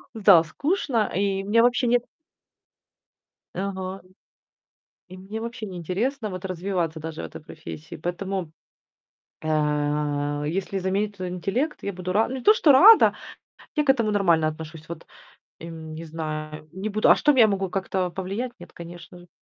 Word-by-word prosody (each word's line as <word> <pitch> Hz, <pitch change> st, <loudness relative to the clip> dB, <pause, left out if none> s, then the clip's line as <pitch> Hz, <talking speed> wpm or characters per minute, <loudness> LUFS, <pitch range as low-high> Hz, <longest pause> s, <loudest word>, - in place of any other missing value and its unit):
Да, 195 Hz, -6 st, +6 dB
скучно, 255 Hz, -, -1 dB
и 195 Hz, +1 st, 0 dB
мне 215 Hz, +4 st, +3 dB
вообще 245 Hz, +2 st, +3 dB
нет 240 Hz, 0 st, +3 dB, 1.5 s
Ага. 190 Hz, 0 st, -4 dB, 1.1 s
И 185 Hz, 0 st, -11 dB
мне 195 Hz, +4 st, -7 dB
вообще 230 Hz, -1 st, -5 dB
неинтересно, 200 Hz, -, -3 dB
вот, 185 Hz, -1 st, -6 dB
развиваться 180 Hz, -3 st, -2 dB
даже 160 Hz, 0 st, -6 dB
в -, -, -5 dB
этой -, -, -10 dB
профессии. 155 Hz, +1 st, -9 dB
Поэтому, 175 Hz, +1 st, -4 dB, 0.9 s
а, 150 Hz, -1 st, 0 dB
если 190 Hz, +4 st, -2 dB
заменить 200 Hz, +2 st, -1 dB
тот 185 Hz, -1 st, -4 dB
интеллект, 195 Hz, -, -2 dB
я 200 Hz, -, -3 dB
буду 180 Hz, 0 st, -4 dB
ра 215 Hz, +4 st, +3 dB
не 260 Hz, +1 st, -5 dB
то 425 Hz, -, +7 dB
что 385 Hz, -10 st, +5 dB
рада, 405 Hz, +12 st, +8 dB, 0.6 s
я 300 Hz, -, +2 dB
к 275 Hz, -, +4 dB
этому 230 Hz, -5 st, +2 dB
нормально 175 Hz, -6 st, +3 dB
отношусь. 155 Hz, +1 st, -8 dB
Вот, 170 Hz, -1 st, -8 dB, 0.5 s
эм, 160 Hz, -1 st, -8 dB
не 165 Hz, +1 st, -7 dB
знаю, 155 Hz, -1 st, -6 dB
не 190 Hz, +4 st, -4 dB
буду 215 Hz, +1 st, +1 dB
А -, -, +8 dB
что, 295 Hz, -, +4 dB
я 235 Hz, -3 st, +7 dB
могу 195 Hz, -3 st, -1 dB
как-то 190 Hz, -1 st, -1 dB
повлиять? 195 Hz, +7 st, -4 dB
Нет, 175 Hz, 0 st, -13 dB
конечно 175 Hz, +1 st, -11 dB
же. 175 Hz, 0 st, -16 dB
185 Hz, 155 wpm, -24 LUFS, 165-215 Hz, 1.5 s, рада